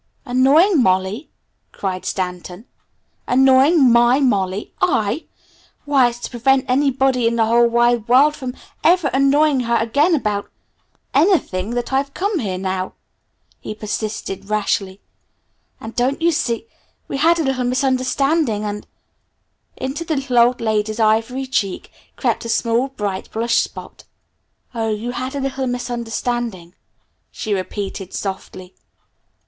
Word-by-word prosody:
"Annoying 280 Hz, +8 st, +4 dB
Molly?" 190 Hz, +6 st, 0 dB, 0.4 s
cried 185 Hz, -2 st, -4 dB
Stanton. 180 Hz, +2 st, -4 dB, 0.6 s
"Annoying 265 Hz, +2 st, +5 dB
my 240 Hz, +3 st, +5 dB
Molly? 200 Hz, -7 st, 0 dB
I? 220 Hz, +8 st, +1 dB, 0.6 s
Why, 275 Hz, -4 st, +4 dB
it's 240 Hz, 0 st, -10 dB
to -, -, -6 dB
prevent 260 Hz, +2 st, +2 dB
anybody 265 Hz, -2 st, +2 dB
in 230 Hz, -, 0 dB
the 225 Hz, -1 st, +2 dB
whole 235 Hz, +1 st, +4 dB
wide 235 Hz, -1 st, +2 dB
world 275 Hz, +5 st, +5 dB
from 255 Hz, -3 st, -6 dB, 0.3 s
ever 345 Hz, -3 st, +4 dB
annoying 275 Hz, +1 st, +3 dB
her 235 Hz, -1 st, 0 dB
again 285 Hz, +10 st, +2 dB
about 210 Hz, -7 st, -2 dB, 0.6 s
anything, 255 Hz, -, +1 dB
that 245 Hz, +2 st, -3 dB
I've 275 Hz, +1 st, -1 dB
come 400 Hz, -1 st, -1 dB
here 195 Hz, -7 st, -3 dB
now!" 185 Hz, 0 st, -3 dB, 0.7 s
he 215 Hz, -, -7 dB
persisted 210 Hz, -2 st, -5 dB
rashly. 200 Hz, -2 st, -1 dB, 0.8 s
"And 225 Hz, +1 st, -9 dB
don't 255 Hz, +3 st, 0 dB
you 340 Hz, +1 st, +3 dB
see 235 Hz, -8 st, -1 dB, 0.4 s
we -, -, -3 dB
had 330 Hz, +4 st, +4 dB
a 325 Hz, -, 0 dB
little 265 Hz, -3 st, -1 dB
misunderstanding 260 Hz, -1 st, +1 dB
and 210 Hz, 0 st, -5 dB, 0.5 s
" -, -, -49 dB
Into 270 Hz, +6 st, -4 dB
the 320 Hz, -1 st, -2 dB
little 265 Hz, -3 st, +1 dB
old 240 Hz, +1 st, +3 dB
lady's 215 Hz, 0 st, -1 dB
ivory 225 Hz, +4 st, +1 dB
cheek 205 Hz, -7 st, -2 dB, 0.2 s
crept -, -, -1 dB
a 230 Hz, -, -6 dB
small, 230 Hz, +3 st, +1 dB
bright, 205 Hz, -8 st, -4 dB
blush 230 Hz, +1 st, +1 dB
spot. -, -, -6 dB, 0.7 s
"Oh, 225 Hz, -2 st, -2 dB
you 220 Hz, +3 st, -3 dB
had 255 Hz, +3 st, -5 dB
a -, -, -2 dB
little 265 Hz, -1 st, -2 dB
misunderstanding," 240 Hz, -6 st, -3 dB, 0.6 s
she 215 Hz, -, -4 dB
repeated 195 Hz, 0 st, -4 dB
softly. 190 Hz, -1 st, -6 dB
240 Hz, 135 wpm, -19 LUFS, 210-270 Hz, 0.8 s, Annoying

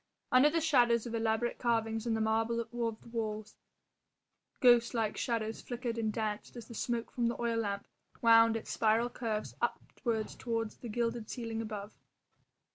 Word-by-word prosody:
Under 255 Hz, +4 st, +7 dB
the 330 Hz, +2 st, 0 dB
shadows 245 Hz, -7 st, +4 dB
of 235 Hz, -, -5 dB
elaborate 225 Hz, +1 st, 0 dB
carvings 225 Hz, -1 st, 0 dB
in 225 Hz, -, +1 dB
the 220 Hz, -, -1 dB
marble 225 Hz, +1 st, +1 dB
of 235 Hz, -, -5 dB
the 230 Hz, -2 st, -3 dB
walls 215 Hz, -2 st, -4 dB, 1.0 s
ghost 240 Hz, -2 st, +5 dB
like 220 Hz, -2 st, 0 dB
shadows 225 Hz, -3 st, -2 dB
flickered 240 Hz, -1 st, -4 dB
and 220 Hz, -1 st, 0 dB
danced 215 Hz, 0 st, -3 dB
as 235 Hz, -, -8 dB
the 235 Hz, -, -9 dB
smoke 235 Hz, +1 st, -2 dB
from 240 Hz, -2 st, 0 dB
the 235 Hz, -, -2 dB
oil 235 Hz, -1 st, 0 dB
lamp 200 Hz, -2 st, -2 dB, 0.3 s
wound 230 Hz, -1 st, +6 dB
its 225 Hz, -, -7 dB
spiral 225 Hz, +2 st, +2 dB
curves 220 Hz, -4 st, -3 dB
upwards 230 Hz, -2 st, -2 dB
to 230 Hz, -2 st, -1 dB, 0.2 s
the 240 Hz, -, -6 dB
gilded 230 Hz, 0 st, -2 dB
ceiling 225 Hz, -2 st, -3 dB
above. 210 Hz, -2 st, -6 dB
230 Hz, 165 wpm, -32 LUFS, 220-240 Hz, 1.0 s, Under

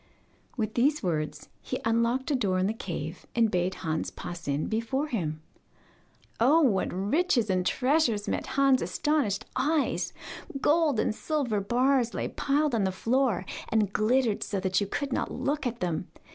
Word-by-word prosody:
With 215 Hz, -2 st, -1 dB
these 285 Hz, +5 st, +2 dB
words 155 Hz, -4 st, -2 dB
he -, -, -4 dB
unlocked 235 Hz, +5 st, +1 dB
a -, -, +3 dB
door 200 Hz, -7 st, +1 dB
in 185 Hz, -, +2 dB
the 210 Hz, -, 0 dB
cave, 170 Hz, -6 st, -6 dB
and 230 Hz, -2 st, +3 dB
bade 180 Hz, +1 st, 0 dB
Hans 160 Hz, -1 st, -1 dB
pass 175 Hz, -2 st, -8 dB
in 140 Hz, +1 st, 0 dB
before 230 Hz, +6 st, -1 dB
him. 155 Hz, -, -2 dB, 1.0 s
Oh, 285 Hz, +8 st, +5 dB
what 215 Hz, -10 st, +2 dB
riches 225 Hz, -, +1 dB
and 185 Hz, -1 st, +1 dB
treasures 250 Hz, -, +1 dB
met -, -, -2 dB
Hans' 275 Hz, -2 st, +4 dB
astonished 275 Hz, -10 st, 0 dB
eyes! 295 Hz, +3 st, +1 dB, 0.5 s
Gold 300 Hz, -4 st, +3 dB
and 215 Hz, -, +1 dB
silver 255 Hz, -5 st, -1 dB
bars 245 Hz, +3 st, +2 dB
lay -, -, -1 dB
piled 290 Hz, 0 st, 0 dB
on 220 Hz, -3 st, +2 dB
the 190 Hz, -, +1 dB
floor, 230 Hz, -1 st, +1 dB, 0.2 s
and 210 Hz, -3 st, +1 dB
glittered 230 Hz, 0 st, +2 dB
so 200 Hz, -, -2 dB
that 185 Hz, 0 st, +1 dB
you 200 Hz, -, -1 dB
could 275 Hz, +6 st, -3 dB
not -, -, -1 dB
look 280 Hz, +2 st, -1 dB
at 240 Hz, 0 st, -5 dB
them! 175 Hz, -1 st, -2 dB
230 Hz, 165 wpm, -28 LUFS, 190-270 Hz, 1.0 s, Oh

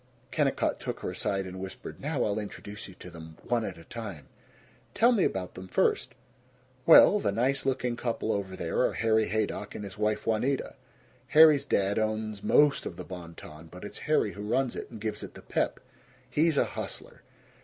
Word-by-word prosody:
Kennicott -, -, +1 dB
took -, -, -5 dB
her -, -, -3 dB
aside 95 Hz, -1 st, -1 dB
and 95 Hz, 0 st, -7 dB
whispered, 95 Hz, 0 st, -8 dB
"Now 145 Hz, -3 st, -1 dB
I'll 105 Hz, 0 st, 0 dB
introduce 105 Hz, 0 st, -7 dB
you 95 Hz, -, -13 dB
to 90 Hz, -, -11 dB
them, 80 Hz, -1 st, -11 dB
one 120 Hz, -1 st, 0 dB
at 95 Hz, -5 st, -5 dB
a 85 Hz, -, -12 dB
time." 100 Hz, -, -8 dB, 0.7 s
"Tell 235 Hz, +2 st, +5 dB
me 215 Hz, -7 st, +3 dB
about 95 Hz, -1 st, -1 dB
them 95 Hz, 0 st, -9 dB
first." -, -, +1 dB, 0.7 s
"Well, 200 Hz, +5 st, +9 dB
the 100 Hz, -, 0 dB
nice 130 Hz, +6 st, 0 dB
looking 125 Hz, -2 st, 0 dB
couple 115 Hz, -2 st, -2 dB
over 95 Hz, -2 st, -2 dB
there 85 Hz, -3 st, -2 dB
are -, -, +3 dB
Harry 110 Hz, -1 st, +2 dB
Haydock 105 Hz, -1 st, -2 dB
and 105 Hz, -, -5 dB
his 100 Hz, 0 st, -9 dB
wife, 105 Hz, 0 st, 0 dB
Juanita. 125 Hz, +5 st, 0 dB, 0.5 s
Harry's 155 Hz, 0 st, +7 dB
dad 100 Hz, +2 st, +1 dB
owns 110 Hz, -1 st, -2 dB
most 145 Hz, -1 st, +4 dB
of -, -, -6 dB
the -, -, -8 dB
Bon 85 Hz, -3 st, -9 dB
Ton, 75 Hz, +2 st, -11 dB
but 90 Hz, +3 st, -12 dB
it's -, -, -7 dB
Harry 150 Hz, -9 st, +3 dB
who 100 Hz, -, -9 dB
runs 120 Hz, +5 st, 0 dB
it -, -, -6 dB
and 115 Hz, -, -9 dB
gives 110 Hz, 0 st, -3 dB
it -, -, -9 dB
the -, -, -11 dB
pep. -, -, -1 dB, 0.5 s
He's 150 Hz, +4 st, +2 dB
a -, -, +4 dB
hustler. -, -, -7 dB
110 Hz, 195 wpm, -29 LUFS, 95-125 Hz, 0.7 s, Well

